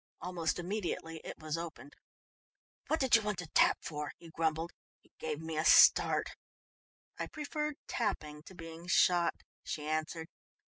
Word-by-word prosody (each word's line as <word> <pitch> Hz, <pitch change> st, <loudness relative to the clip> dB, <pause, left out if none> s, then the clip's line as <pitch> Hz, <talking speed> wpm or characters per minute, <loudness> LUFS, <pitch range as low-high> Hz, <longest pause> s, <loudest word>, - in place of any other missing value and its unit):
Almost 175 Hz, -3 st, -1 dB
immediately 175 Hz, -3 st, -3 dB
it -, -, -7 dB
was 155 Hz, +1 st, -3 dB
opened. 160 Hz, -3 st, -8 dB, 0.9 s
"What 315 Hz, -, +1 dB
did 265 Hz, -3 st, +5 dB
you 230 Hz, -, +5 dB
want 210 Hz, -2 st, -2 dB
to 180 Hz, -, -4 dB
tap 155 Hz, -, +4 dB
for?" 150 Hz, -1 st, -4 dB
he 165 Hz, -1 st, -13 dB
grumbled. 160 Hz, +1 st, -1 dB, 0.3 s
"You -, -, -27 dB
gave 155 Hz, -2 st, -3 dB
me 160 Hz, -1 st, -5 dB
a -, -, +1 dB
start." -, -, +6 dB, 0.9 s
"I -, -, -2 dB
preferred 300 Hz, 0 st, -3 dB
tapping 150 Hz, -10 st, -2 dB
to 190 Hz, -, -11 dB
being 165 Hz, 0 st, -9 dB
shot," 175 Hz, -1 st, +4 dB, 0.3 s
she 150 Hz, -, -4 dB
answered. 155 Hz, +1 st, -2 dB
165 Hz, 150 wpm, -33 LUFS, 155-185 Hz, 0.9 s, start